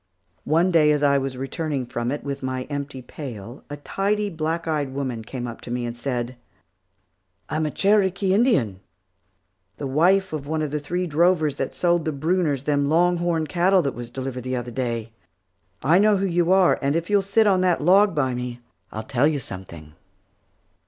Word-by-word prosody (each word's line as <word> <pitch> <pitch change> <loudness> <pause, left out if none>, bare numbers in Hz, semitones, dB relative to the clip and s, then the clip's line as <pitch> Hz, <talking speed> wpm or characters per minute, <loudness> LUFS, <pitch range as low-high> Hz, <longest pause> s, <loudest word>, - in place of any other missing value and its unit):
One 170 +4 +3
day 155 -3 +5
as 150 -1 +1
I 140 -1 +4
was 135 -1 -4
returning 135 0 -3
from 120 -1 -3
it 145 - -4
with 140 -1 -4
my 130 -1 -3
empty 140 -2 -5
pail, 120 -3 -8
a 145 - -6
tidy, 200 +7 -1
black 165 +1 -2
eyed 145 -4 -1
woman 130 -5 -3
came 125 +2 -6
up 120 -1 -7
to - - -10
me 120 0 -2
and 120 0 -5
said, 120 0 -3 1.1
"I'm 155 0 0
a - - -1
Cherokee 195 +1 +2
Indian, 195 - +2 1.0
the 145 - -5
wife 175 +7 +2
of 145 -2 -4
one 155 0 -1
of 150 - -3
the 150 - -1
three 175 +5 -2
drovers 160 -2 +2
that - - -3
sold 175 -2 +1
the 155 - 0
Brunners 155 -2 0
them 145 -1 +1
long 175 +3 +3
horned 170 -2 -1
cattle 185 +1 +3
that 140 - -1
was 120 -1 -7
delivered 130 0 -5
the 130 0 -2
other 120 -1 -4
day. 115 -3 -3 0.7
I 160 +7 +5
know 210 0 +4
who 195 - 0
you 175 -1 +1
are, 190 -1 +4
and 140 +2 +1
if 165 +3 -2
you'll 205 -1 +4
sit 200 +3 +2
on 190 -3 +3
that 180 -2 +2
log 190 +4 +4
by 130 -4 +1
me, 125 0 -5 0.3
I'll 110 - -5
tell 135 +2 +2
you 155 -2 0
something." 85 - -8
150 Hz, 195 wpm, -23 LUFS, 130-175 Hz, 1.1 s, day